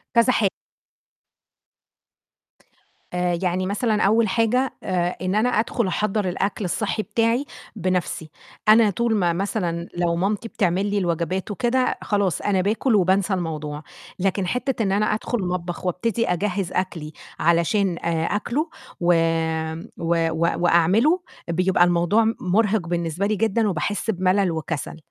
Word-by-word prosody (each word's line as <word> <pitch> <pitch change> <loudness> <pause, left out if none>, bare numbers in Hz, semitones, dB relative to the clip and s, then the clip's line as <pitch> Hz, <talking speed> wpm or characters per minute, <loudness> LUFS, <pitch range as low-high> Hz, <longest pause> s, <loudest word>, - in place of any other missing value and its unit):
كذا 235 +2 +5
حا 205 - +3 2.7
آآ 180 -1 0
يعني 185 0 0
مثلًا 210 +2 0
أول 220 +3 +4
حاجة، 240 +5 +1
آآ 180 -1 0
إن 185 +2 -1
أنا 225 +4 +3
أدخُل 230 -2 0
أحضّر 200 +1 0
الأكل 195 +2 -2
الصحي 215 +4 -1
بتاعي 230 +4 +1 0.3
بنفْسي، 180 -4 -2 0.4
أنا 220 0 +7
طول 230 +3 0
ما 175 -4 +2
مثلًا 175 -2 -2
لو 170 -1 +1
مامتي 200 +5 -1
بتعمل 190 -2 0
لي 205 0 -1
الوجبات 180 +2 -1
وكده، 250 +3 0
خلاص 200 -4 0
أنا 195 -2 +1
باكل 215 +4 +1
وبانسى 190 +1 +2
الموضوع، 155 -4 -4 0.4
لكن 190 0 0
حتّة 250 +1 -1
إن 195 - 0
أنا 205 +2 +2
أدخُل 230 +3 -2
المطبخ 180 0 -3
وأبتدي 230 +6 0
أجهّز 185 +1 -1
أكلي 170 -5 -3 0.3
علشان 170 +2 +2
آآ 165 -1 -1
آكله، 250 - -1 0.3
وآمم 165 -1 0
و 165 0 +1 0.3
وأعمله، 190 - +4 0.3
بيبقى 180 +1 +3
الموضوع 175 +6 +3 0.2
مُرهق 200 -1 +1
بالنسبة 170 +2 -1
لي 215 +1 +1
جدًا 220 0 +1
وباحس 205 +6 -2
بملل 185 -1 +2
وكسل، 160 -1 -4
190 Hz, 130 wpm, -23 LUFS, 170-215 Hz, 2.7 s, أنا